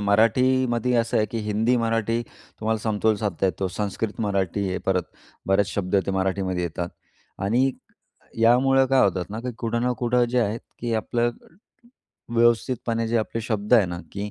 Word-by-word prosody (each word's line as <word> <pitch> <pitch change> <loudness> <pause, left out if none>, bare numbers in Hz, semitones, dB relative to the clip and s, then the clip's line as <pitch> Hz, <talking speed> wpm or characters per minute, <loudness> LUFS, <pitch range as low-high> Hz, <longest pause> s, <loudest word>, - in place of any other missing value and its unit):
मराठीमध्ये 120 +4 +2
असं 115 0 +1
आहे, 110 - +2
की 115 - -4
हिंदी, 110 +4 +2
मराठी 115 0 0 0.4
तुम्हाला 110 0 0
समतोल 110 0 +1
साधता 100 -2 -1
येतो. 95 0 -1
संस्कृत, 105 +2 -3
मराठी, 100 -2 0
हे 95 - -2
परत 95 -1 +2 0.4
बरेच 95 0 +3
शब्द 100 -1 0
ते - - 0
मराठीमध्ये 95 -1 -1
येतात. 85 +1 -3 0.5
आणि 120 +7 +2 0.7
यामुळं 130 +3 +4
काय 135 0 +4
होतात 95 -1 -1
ना, 110 +2 -4
की 125 0 -4
कुठं 115 0 -1
ना 125 0 +1
कुठं 120 0 +3
जे 125 - +1
आहेत, 110 +1 -1 0.2
की 115 -1 -1
आपलं 120 +2 0 1.0
व्यवस्थितपणे 115 0 +1
जे 115 - +1
आपले 115 +1 -3
शब्द 110 +1 +1
आहे 110 -5 +5
ना, 85 0 -5
की 100 +1 -4
110 Hz, 165 wpm, -24 LUFS, 100-120 Hz, 1.0 s, आहे